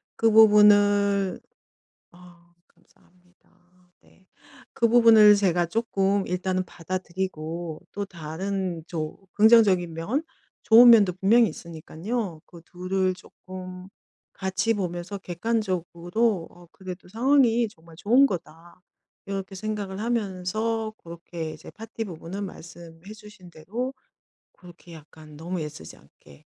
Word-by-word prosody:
그 225 Hz, -1 st, +2 dB
부분을 205 Hz, -2 st, +5 dB, 0.7 s
아 175 Hz, -1 st, -19 dB
감사합니다. 180 Hz, 0 st, -31 dB
네. 190 Hz, -, -26 dB, 0.5 s
그 230 Hz, -, +2 dB
부분을 225 Hz, -3 st, +7 dB
제가 175 Hz, -4 st, +1 dB
쪼끔 200 Hz, -1 st, 0 dB
일단은 185 Hz, +1 st, -2 dB
받아들이고 175 Hz, -2 st, -5 dB
또 205 Hz, 0 st, -4 dB
다른 175 Hz, +1 st, -5 dB
조 155 Hz, -3 st, -5 dB, 0.2 s
긍정적인 205 Hz, -6 st, +4 dB
면 220 Hz, -, -2 dB, 0.4 s
좋은 235 Hz, +2 st, +8 dB
면도 205 Hz, -6 st, +6 dB
분명히 210 Hz, +4 st, +3 dB
있으니깐요. 170 Hz, +4 st, -6 dB
그 170 Hz, -2 st, -15 dB
둘을 185 Hz, +1 st, -2 dB
쪼끔 185 Hz, 0 st, -11 dB, 0.4 s
같이 190 Hz, +4 st, -1 dB
보면서 180 Hz, 0 st, -4 dB
객관적으로 185 Hz, 0 st, -2 dB
'어 175 Hz, -1 st, -18 dB
그래도 185 Hz, -2 st, -10 dB
상황이 240 Hz, 0 st, +2 dB
정말 165 Hz, -3 st, -18 dB
좋은 245 Hz, +8 st, +4 dB
거다.' 170 Hz, -1 st, -8 dB, 0.5 s
이렇게 195 Hz, 0 st, -6 dB
생각을 205 Hz, -1 st, -5 dB
하면서 220 Hz, 0 st, -2 dB
그렇게 170 Hz, -1 st, -7 dB
이제 155 Hz, -, -13 dB
파티 225 Hz, +1 st, -7 dB
부분은 185 Hz, +3 st, -7 dB
말씀해 170 Hz, +2 st, -12 dB
주신 210 Hz, -4 st, -15 dB
대로 225 Hz, +12 st, -5 dB, 0.6 s
그렇게 175 Hz, -1 st, -16 dB
약간 155 Hz, -1 st, -14 dB
너무 175 Hz, +2 st, -5 dB
애쓰지 145 Hz, -, -9 dB
않게 70 Hz, -, -21 dB
185 Hz, 255 characters per minute, -25 LUFS, 170-210 Hz, 0.7 s, 좋은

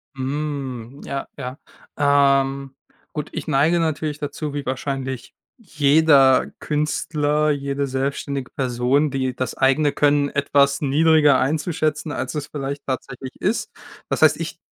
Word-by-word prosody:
Hm, 135 Hz, -2 st, -4 dB
ja, 140 Hz, 0 st, -4 dB
ja. 130 Hz, 0 st, -6 dB, 0.4 s
Ähm, 140 Hz, -1 st, +2 dB, 0.4 s
gut, 150 Hz, 0 st, -4 dB
ich -, -, -5 dB
neige 155 Hz, +4 st, +3 dB
natürlich 155 Hz, -2 st, -2 dB
dazu, 145 Hz, 0 st, -4 dB
wie 145 Hz, -, -3 dB
wahrscheinlich 130 Hz, -1 st, -4 dB, 0.2 s
jeder 150 Hz, -, +4 dB
Künstler, 150 Hz, 0 st, 0 dB
jede 140 Hz, -1 st, -1 dB
selbständige 135 Hz, 0 st, -3 dB
Person, 130 Hz, +3 st, +1 dB
die 130 Hz, -2 st, -2 dB
das 130 Hz, -2 st, -3 dB
eigene 140 Hz, +2 st, +3 dB
Können 145 Hz, -1 st, +2 dB
etwas 140 Hz, 0 st, +2 dB
niedriger 150 Hz, +1 st, +4 dB
einzuschätzen, 155 Hz, +1 st, -1 dB
als -, -, -4 dB
es 150 Hz, -1 st, -3 dB
vielleicht 140 Hz, -1 st, -5 dB
tatsächlich 130 Hz, 0 st, -5 dB
ist. 210 Hz, +5 st, -1 dB, 0.4 s
Das -, -, -1 dB
heißt, -, -, +6 dB
ich -, -, -5 dB
140 Hz, 125 wpm, -22 LUFS, 135-150 Hz, 0.4 s, heißt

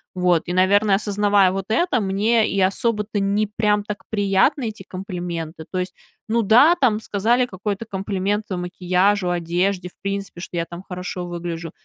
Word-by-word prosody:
Вот. 180 Hz, -2 st, +2 dB
И, 175 Hz, -, -2 dB
наверно, 195 Hz, +2 st, +4 dB
осознавая 205 Hz, -2 st, +2 dB
вот 195 Hz, 0 st, -3 dB
это, 250 Hz, +2 st, +2 dB
мне 210 Hz, +4 st, +2 dB
и 195 Hz, -, -1 dB
особо-то 210 Hz, +2 st, 0 dB
не 200 Hz, +2 st, +1 dB
прям 210 Hz, -1 st, +2 dB
так 210 Hz, +1 st, -6 dB
приятны 205 Hz, +5 st, +2 dB
эти 215 Hz, -2 st, -10 dB
комплименты, 175 Hz, -4 st, -6 dB
то 185 Hz, -, -3 dB
есть. 180 Hz, +1 st, -2 dB, 0.4 s
Ну 230 Hz, -1 st, +2 dB
да, 250 Hz, -, +6 dB
там 225 Hz, -5 st, +3 dB
сказали 235 Hz, +5 st, +1 dB
какой-то 200 Hz, +1 st, -4 dB
комплимент 200 Hz, +1 st, -2 dB
макияжу, 180 Hz, +1 st, +1 dB
одежде, 180 Hz, +2 st, -1 dB
в -, -, -32 dB
принципе, 195 Hz, -2 st, -4 dB
что 175 Hz, -, -6 dB
я 170 Hz, -, 0 dB
там 170 Hz, +2 st, -9 dB
хорошо 180 Hz, -1 st, -5 dB
выгляжу. 170 Hz, -1 st, -5 dB
195 Hz, 160 wpm, -22 LUFS, 180-210 Hz, 0.4 s, да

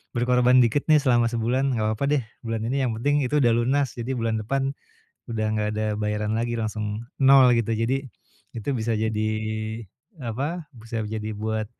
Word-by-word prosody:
berkorban 125 Hz, +1 st, +4 dB
dikit 120 Hz, +5 st, +1 dB
nih 155 Hz, -, +7 dB
selama 120 Hz, -5 st, +3 dB
sebulan 125 Hz, +4 st, 0 dB
enggak 110 Hz, -, 0 dB
apa-apa 110 Hz, +6 st, -2 dB
deh 130 Hz, -, -2 dB, 0.2 s
bulan 115 Hz, -1 st, -3 dB
ini 135 Hz, +4 st, 0 dB
yang 130 Hz, -3 st, 0 dB
penting 145 Hz, +4 st, +1 dB
itu 135 Hz, +3 st, 0 dB
udah 120 Hz, -1 st, +4 dB
lunas. 130 Hz, +2 st, +1 dB
Jadi 120 Hz, +2 st, -4 dB
bulan 115 Hz, -1 st, -1 dB
depan 135 Hz, +5 st, -1 dB, 0.5 s
udah 110 Hz, -2 st, -2 dB
enggak 105 Hz, -1 st, 0 dB
ada 110 Hz, 0 st, -1 dB
bayaran 105 Hz, 0 st, -1 dB
lagi, 120 Hz, 0 st, -1 dB
langsung 110 Hz, -1 st, -3 dB, 0.2 s
nol 135 Hz, -2 st, +7 dB
gitu. 115 Hz, 0 st, 0 dB
Jadi 130 Hz, +5 st, -1 dB, 0.5 s
itu 115 Hz, +4 st, -4 dB
bisa 115 Hz, 0 st, -1 dB
jadi 110 Hz, 0 st, 0 dB, 0.9 s
apa, 145 Hz, +8 st, -4 dB
bisa 115 Hz, 0 st, -5 dB
jadi 110 Hz, 0 st, -4 dB
buat 110 Hz, +1 st, -2 dB
115 Hz, 175 wpm, -24 LUFS, 110-130 Hz, 0.9 s, nih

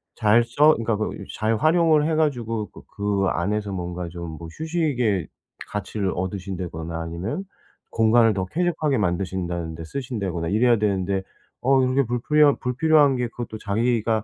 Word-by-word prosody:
잘 115 Hz, +1 st, +4 dB
써 150 Hz, +5 st, +4 dB
그러니까 115 Hz, -1 st, -1 dB
그 110 Hz, -, -1 dB, 0.3 s
잘 110 Hz, +1 st, +1 dB
활용을 155 Hz, +1 st, +3 dB
해 160 Hz, -, +1 dB
가지고 115 Hz, -8 st, -1 dB
그 -, -, -13 dB
그 100 Hz, -1 st, 0 dB
안에서 100 Hz, +3 st, -1 dB
뭔가 90 Hz, -1 st, -4 dB
좀 85 Hz, -1 st, -7 dB
뭐 85 Hz, -, -8 dB
휴식의 135 Hz, -, -1 dB, 0.4 s
가치를 105 Hz, -1 st, -3 dB
얻으신다거나 90 Hz, -3 st, -4 dB
아니면 90 Hz, -, -4 dB, 0.5 s
공간을 115 Hz, 0 st, +4 dB
더 95 Hz, -1 st, -2 dB
쾌적하게 160 Hz, -, 0 dB
만드신다는데 85 Hz, -4 st, -2 dB
쓰신다거나 100 Hz, -, -3 dB
이래야 115 Hz, +1 st, +3 dB
되는데 95 Hz, -2 st, 0 dB, 0.4 s
어 135 Hz, +1 st, +4 dB
이렇게 130 Hz, +2 st, +2 dB
불필요한 145 Hz, +5 st, +3 dB
불필요한 145 Hz, +2 st, +3 dB
게 125 Hz, -1 st, -1 dB
그것도 115 Hz, -2 st, -6 dB
자기가 110 Hz, +1 st, 0 dB
110 Hz, 350 characters per minute, -23 LUFS, 95-130 Hz, 0.5 s, 잘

